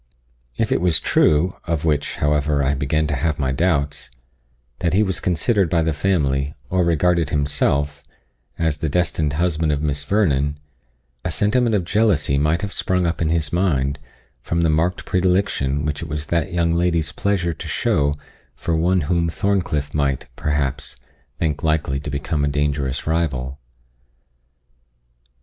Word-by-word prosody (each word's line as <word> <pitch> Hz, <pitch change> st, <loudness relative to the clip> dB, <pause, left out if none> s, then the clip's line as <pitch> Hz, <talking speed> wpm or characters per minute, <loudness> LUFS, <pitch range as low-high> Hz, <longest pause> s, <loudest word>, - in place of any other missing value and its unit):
If -, -, 0 dB
it -, -, +2 dB
was 85 Hz, -3 st, +4 dB
true, 80 Hz, +4 st, +2 dB
of 80 Hz, -2 st, -1 dB
which, 75 Hz, -2 st, 0 dB
however, 75 Hz, -1 st, +1 dB
I 70 Hz, +1 st, +2 dB
began 70 Hz, +3 st, 0 dB
to 75 Hz, -1 st, -1 dB
have 75 Hz, +3 st, -1 dB
my 65 Hz, -3 st, 0 dB
doubts, 70 Hz, -3 st, 0 dB, 0.7 s
that 85 Hz, -, 0 dB
he 105 Hz, -, +4 dB
was 95 Hz, -4 st, -1 dB
considered 95 Hz, +2 st, +1 dB
by 85 Hz, -2 st, +2 dB
the 80 Hz, -1 st, 0 dB
family, 70 Hz, -4 st, 0 dB, 0.2 s
or 90 Hz, 0 st, +2 dB
regarded 85 Hz, -1 st, +2 dB
himself, 70 Hz, 0 st, 0 dB, 0.6 s
as 80 Hz, -3 st, 0 dB
the 80 Hz, -, -1 dB
destined 80 Hz, -2 st, 0 dB
husband 80 Hz, -1 st, 0 dB
of 75 Hz, 0 st, -1 dB
Miss 70 Hz, -1 st, -1 dB
Vernon, 75 Hz, -6 st, +1 dB, 0.7 s
a -, -, -2 dB
sentiment 105 Hz, +8 st, +2 dB
of 95 Hz, -, +1 dB
jealousy 85 Hz, -8 st, +2 dB
might 75 Hz, +5 st, +1 dB
have 100 Hz, -, -3 dB
sprung 90 Hz, -1 st, 0 dB
up 85 Hz, 0 st, -1 dB
in 80 Hz, -, +1 dB
his 80 Hz, -1 st, -1 dB
mind 70 Hz, -6 st, +1 dB, 0.4 s
from 85 Hz, +6 st, -1 dB
the 80 Hz, -2 st, +3 dB
marked 85 Hz, +4 st, 0 dB
predilection 90 Hz, -7 st, +1 dB
which 75 Hz, -1 st, -2 dB
it -, -, -6 dB
was 75 Hz, 0 st, -3 dB
that 85 Hz, +3 st, -1 dB
young 85 Hz, -1 st, +1 dB
lady's 85 Hz, -3 st, +1 dB
pleasure 95 Hz, -4 st, 0 dB
to -, -, -8 dB
show 70 Hz, 0 st, +1 dB, 0.4 s
for 85 Hz, -, -2 dB
one 90 Hz, +3 st, +2 dB
whom 85 Hz, +2 st, 0 dB
Thorncliff 85 Hz, -6 st, -1 dB
might, 70 Hz, -3 st, 0 dB
perhaps, 75 Hz, -4 st, -2 dB, 0.4 s
think 75 Hz, -3 st, -1 dB
likely 80 Hz, -4 st, 0 dB
to 75 Hz, -, -6 dB
become 70 Hz, +2 st, -2 dB
a -, -, +2 dB
dangerous 70 Hz, -2 st, -1 dB
rival. 70 Hz, -5 st, -1 dB
80 Hz, 160 wpm, -21 LUFS, 70-85 Hz, 0.7 s, was